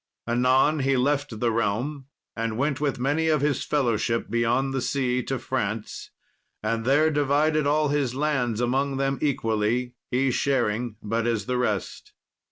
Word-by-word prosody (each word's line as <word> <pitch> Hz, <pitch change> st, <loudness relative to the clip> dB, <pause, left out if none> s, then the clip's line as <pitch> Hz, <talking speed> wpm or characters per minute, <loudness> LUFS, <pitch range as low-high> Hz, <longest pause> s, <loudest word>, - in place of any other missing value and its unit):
Anon 130 Hz, +5 st, +3 dB
he 135 Hz, -1 st, +2 dB
left 140 Hz, -3 st, 0 dB
the 120 Hz, 0 st, +1 dB
realm, 115 Hz, +6 st, -2 dB, 0.3 s
and 115 Hz, -1 st, -2 dB
went 140 Hz, +1 st, 0 dB
with 145 Hz, -2 st, 0 dB
many 145 Hz, +6 st, 0 dB
of 155 Hz, -3 st, +2 dB
his 145 Hz, -2 st, 0 dB
fellowship 115 Hz, -6 st, 0 dB
beyond 120 Hz, +3 st, +1 dB
the 135 Hz, -, -1 dB
sea 125 Hz, -1 st, 0 dB
to 135 Hz, +1 st, -3 dB
France, 110 Hz, -4 st, -4 dB, 0.5 s
and 115 Hz, +1 st, -1 dB
there 150 Hz, +4 st, +4 dB
divided 145 Hz, +1 st, +2 dB
all 150 Hz, 0 st, +2 dB
his 140 Hz, -4 st, 0 dB
lands 130 Hz, -6 st, 0 dB
among 135 Hz, +3 st, 0 dB
them 135 Hz, 0 st, 0 dB
equally, 120 Hz, -3 st, 0 dB, 0.2 s
he 130 Hz, +1 st, +1 dB
sharing 120 Hz, -4 st, 0 dB
but 115 Hz, +2 st, -1 dB
as 115 Hz, -4 st, -1 dB
the 125 Hz, +1 st, -1 dB
rest. 105 Hz, -6 st, -3 dB
130 Hz, 155 wpm, -25 LUFS, 115-140 Hz, 0.5 s, there